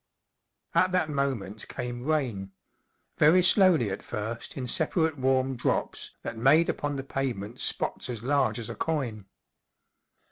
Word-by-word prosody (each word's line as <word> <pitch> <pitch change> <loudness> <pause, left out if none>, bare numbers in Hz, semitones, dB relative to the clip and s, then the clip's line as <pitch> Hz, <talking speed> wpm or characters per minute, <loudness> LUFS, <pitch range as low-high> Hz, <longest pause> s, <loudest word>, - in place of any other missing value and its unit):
At 185 - +3
that 170 -4 +1
mo¬ 140 -3 0
ment 100 +1 -9
came 120 0 -5
rain. 125 -11 -1 0.7
Very 170 +5 +6
slowly 180 - +5
at 95 - -4
first 110 +5 -5
in 130 - -3
separate 160 +4 +1
warm 130 0 +1
drop® 120 - -2
that - - -5
made 150 +8 +5
upon 145 -1 -2
the 135 - -4
pavement 125 -5 -4
spots - - -1
as 115 -3 -5
large 140 0 +1
as 115 -2 -5
a - - -4
coin. 125 -11 -3
135 Hz, 145 wpm, -28 LUFS, 115-150 Hz, 0.7 s, Very